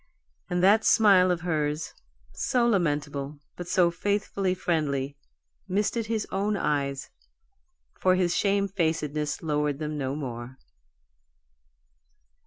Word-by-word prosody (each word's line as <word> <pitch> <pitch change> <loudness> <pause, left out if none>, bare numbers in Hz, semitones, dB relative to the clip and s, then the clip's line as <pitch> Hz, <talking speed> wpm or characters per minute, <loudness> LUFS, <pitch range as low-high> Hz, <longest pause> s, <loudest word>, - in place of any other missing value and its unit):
And 180 0 0
that 210 +3 +5
smile 195 -5 +5
of 175 -2 0
hers, 155 -3 -2 0.4
so 240 - +1
lamentable, 150 -8 -1 0.2
but 175 - -7
so 175 -1 +3
faithfully 200 0 -1
friendly, 145 -6 -1 0.5
misted 210 +3 0
his 220 -1 -1
own 200 +2 0
eyes, 140 -5 -1 0.9
for 185 0 +3
his 180 -2 +1
shamefacedness 165 -8 0
lowered 150 -2 0
them 150 0 -4
no 135 0 -2
more. 125 -3 -6
170 Hz, 105 wpm, -27 LUFS, 145-195 Hz, 0.9 s, that